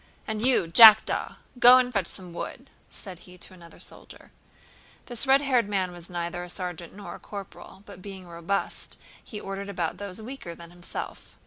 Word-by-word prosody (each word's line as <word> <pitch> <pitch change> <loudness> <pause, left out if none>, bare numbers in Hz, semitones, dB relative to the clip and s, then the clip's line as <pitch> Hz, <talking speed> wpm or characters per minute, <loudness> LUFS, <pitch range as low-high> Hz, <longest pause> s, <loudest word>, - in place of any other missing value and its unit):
"And 220 -1 -3
you, 255 -7 +4
Jackdaw, 215 +6 +7 0.2
go 245 +1 +9
and 250 -1 +1
fetch 195 -5 0
some 180 -3 -8
wood!" - - -7 0.2
said 185 -4 -10
he 180 0 -15
to 185 - -8
another 170 -2 -15
soldier. - - -10 0.7
This 240 +2 -2
red 270 +1 +5
haired 250 -7 +1
man 190 -3 -1
was 175 -1 -12
neither 175 0 -4
a 180 - -9
sergeant 175 -2 -4
nor 205 - -8
a - - -10
corporal, 195 -1 -10
but 200 -3 -12
being 190 -1 -9
robust 170 +4 -3 0.3
he 210 - -7
ordered 195 0 -6
about 175 -3 -3
those 200 0 -6
weaker 220 -7 -8
than 170 0 -12
himself. 175 0 -8
190 Hz, 180 wpm, -26 LUFS, 175-215 Hz, 0.7 s, go